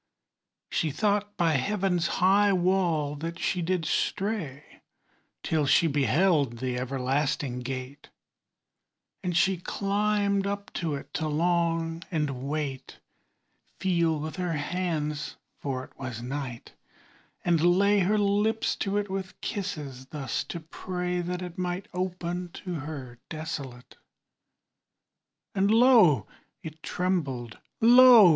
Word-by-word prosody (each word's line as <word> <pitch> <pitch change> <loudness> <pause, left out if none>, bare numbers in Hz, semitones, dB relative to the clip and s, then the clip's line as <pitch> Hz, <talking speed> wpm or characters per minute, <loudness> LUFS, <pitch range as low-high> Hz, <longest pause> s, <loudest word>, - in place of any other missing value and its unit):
She 160 - +1
thought 205 +5 0
by 170 -2 +3
heaven's 180 +3 +1
high 200 +2 +4
wall 175 -5 +1
that 165 +3 -5
she 180 +1 -1
did 175 -1 0
stray 190 -11 -2 0.6
Till 155 -3 +1
she 150 - +5
beheld 145 -1 +2
the 125 +1 -2
everlasting 135 +1 -1
gate: 130 +2 -6 1.1
And 180 -2 0
she 190 +1 +3
climbed 200 +1 0
up 200 0 -4
to 160 -4 -2
it 140 - -9
to 155 +1 -1
long, 165 +1 +1
and 150 -6 -2
wait, 145 -3 -4 0.8
Feel 170 -4 +1
with 155 +3 -5
her 180 -2 -1
hands 150 -1 -2 0.2
(for 130 -2 -3
it - - -15
was 130 -4 -5
night), 125 -1 -5 0.7
and 170 -3 +3 0.2
lay 200 +1 +4
Her 200 +3 +2
lips 210 +2 +1
to 200 0 -1
it 205 0 0
with 190 -1 -5
kisses; 145 -10 -4
thus 135 -4 -3
to 170 - -5
pray 180 +2 -3
That 180 +1 -3
it 180 +1 -7
might 180 +1 -2
open 180 -1 -3 0.2
to 180 - -3
her 140 -6 -6
desolate. 150 -6 -6 1.6
And 195 0 +2
lo! 220 - +6 0.4
it 160 0 -8
trembled, 140 -13 -2 0.2
lo! 240 -3 +9
170 Hz, 120 wpm, -27 LUFS, 145-190 Hz, 1.6 s, lo